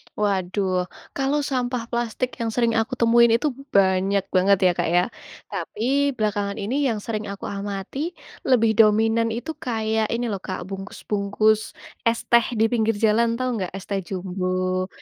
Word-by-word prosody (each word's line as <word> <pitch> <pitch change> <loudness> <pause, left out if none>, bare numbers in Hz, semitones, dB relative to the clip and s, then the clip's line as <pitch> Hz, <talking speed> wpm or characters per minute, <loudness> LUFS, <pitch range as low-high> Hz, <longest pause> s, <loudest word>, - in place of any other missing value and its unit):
Waduh, 190 -2 0 0.3
kalau 275 +2 +1
sampah 250 -2 -1
plastik 240 +1 -1
yang 230 -1 -1
sering 235 -1 +2
aku 225 +4 -2
temuin 235 0 +6
itu 240 +6 +1 0.3
banyak 195 0 +3
banget 195 +2 +5
ya 180 - +6
Kak - - +1
ya. 180 - +5 0.5
Tapi, - - -5 0.4
belakangan 205 -2 -1
ini 255 +7 0
yang 225 -4 0
sering 215 -2 -3
aku 200 0 -6
amati, 200 +4 -5 0.5
lebih 230 -4 +4
dominan 225 +1 +4
itu 240 +8 -4
kayak 220 -2 0
ini 240 +1 -1
loh 200 - -3
Kak, 185 -2 -5
bungkus-bungkus 205 +2 0 0.5
es 230 0 +2
teh 235 -1 +5
di 220 - +5
pinggir 225 -2 +1
jalan. 220 +2 +3
Tahu 255 0 -1
enggak 185 -2 -3
es 195 - -8
teh 200 -1 0
jumbo, 185 0 -2
215 Hz, 155 wpm, -23 LUFS, 195-235 Hz, 0.5 s, temuin